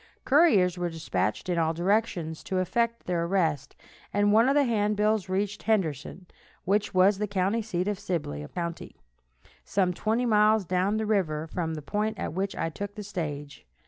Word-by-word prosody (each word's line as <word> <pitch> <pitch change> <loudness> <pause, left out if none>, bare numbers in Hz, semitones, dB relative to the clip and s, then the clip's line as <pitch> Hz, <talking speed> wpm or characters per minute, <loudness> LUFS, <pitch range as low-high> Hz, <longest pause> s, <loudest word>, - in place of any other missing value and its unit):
Couriers 205 - +4
were 175 0 -1
dispatched 155 - -2
in 175 -2 0
all 160 0 +1
directions 175 -3 0
to 190 - -2
effect 230 +6 0
their 175 -2 0
arrest, 160 -6 0 0.4
and 205 0 +2
one 230 +4 +5
of 275 - +2
the 290 - +5
handbills 210 -3 +1
reached 200 +2 -1
Henderson, 180 - -1 0.4
which 205 +2 +1
was 190 +2 +4
the 210 - -1
county 200 +3 0
seat 185 -4 -2
of 205 -2 -2
Sibley 165 - -3
county, 170 -1 -5 0.7
some 185 -2 +1
twenty 225 +7 0
miles 215 -2 +4
down 185 +4 +1
the 220 - -1
river 170 -8 0
from 160 0 -3
the 155 - -7
point 210 +6 -2
at - - -4
which 195 +2 -2
I 165 - -1
took 205 +5 -6
the 210 - -6
stage. 150 - -6
190 Hz, 175 wpm, -27 LUFS, 170-210 Hz, 0.7 s, one